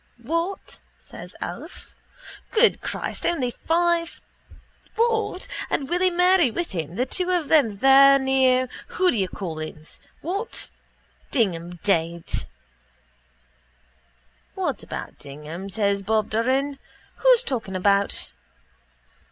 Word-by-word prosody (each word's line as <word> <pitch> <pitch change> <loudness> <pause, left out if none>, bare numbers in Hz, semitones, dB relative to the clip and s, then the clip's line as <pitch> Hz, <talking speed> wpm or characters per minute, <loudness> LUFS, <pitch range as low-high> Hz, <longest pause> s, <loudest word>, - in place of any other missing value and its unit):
—What? 335 +4 -3 0.2
says - - -12
Alf. - - -8 0.6
Good 460 +1 +4
Christ, - - -4
only 260 -8 0
five... 340 +3 0 0.8
What?... 450 -4 0 0.2
And 275 - -1
Willy 360 +1 +2
Murray 360 -3 +4
with 345 +9 -3
him, 165 -2 -4
the 250 - 0
two 360 +7 -2
of 350 -5 0
them 235 -10 +4
there 275 +3 +7
near 260 -1 +3 0.3
whatdoyoucallhim's... 180 - -2 0.2
What? 395 +8 -4 0.6
Dignam 175 -8 0
dead? 170 -3 0 2.1
—What - - -2
about - - -7
Dignam? 150 +7 -8
says 200 0 0
Bob 215 +1 0
Doran. 265 +5 0 0.4
Who's - - +5
talking 225 - -3
about...? 200 +1 +1
260 Hz, 100 wpm, -24 LUFS, -, 2.1 s, there